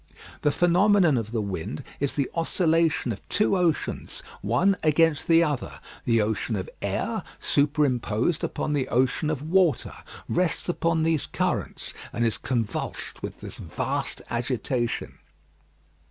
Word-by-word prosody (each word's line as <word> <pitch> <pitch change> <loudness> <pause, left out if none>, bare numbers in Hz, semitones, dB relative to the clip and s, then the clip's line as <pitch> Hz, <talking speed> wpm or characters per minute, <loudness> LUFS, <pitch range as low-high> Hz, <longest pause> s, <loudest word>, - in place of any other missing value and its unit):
The - - +3
phenomenon 175 0 +4
of 115 -3 -2
the 115 -3 -1
wind 90 -6 -4 0.2
is 140 -1 0
the 140 -3 +1
oscillation 165 -4 +2
of 100 - -5
two 210 -2 +2
oceans 175 -4 -1 0.2
one 170 - +3
against 155 0 +3
the 165 0 +6
other; 145 -5 -2 0.3
the 115 -2 +3
ocean 110 +1 -1
of 95 - -3
air, - - -1 0.2
superimposed 140 -2 +1
upon 150 - -1
the 140 -3 0
ocean 130 +4 +1
of 150 -3 -2
water, 170 -3 +2 0.3
rests 175 -2 0
upon 165 -2 +1
these 160 -3 +1
currents, - - -2 0.2
and 120 - 0
is 115 - 0
convulsed 115 -5 -3
with - - -6
this - - -7
vast - - -3
agitation. 120 0 -2
145 Hz, 135 wpm, -26 LUFS, 120-165 Hz, 0.3 s, the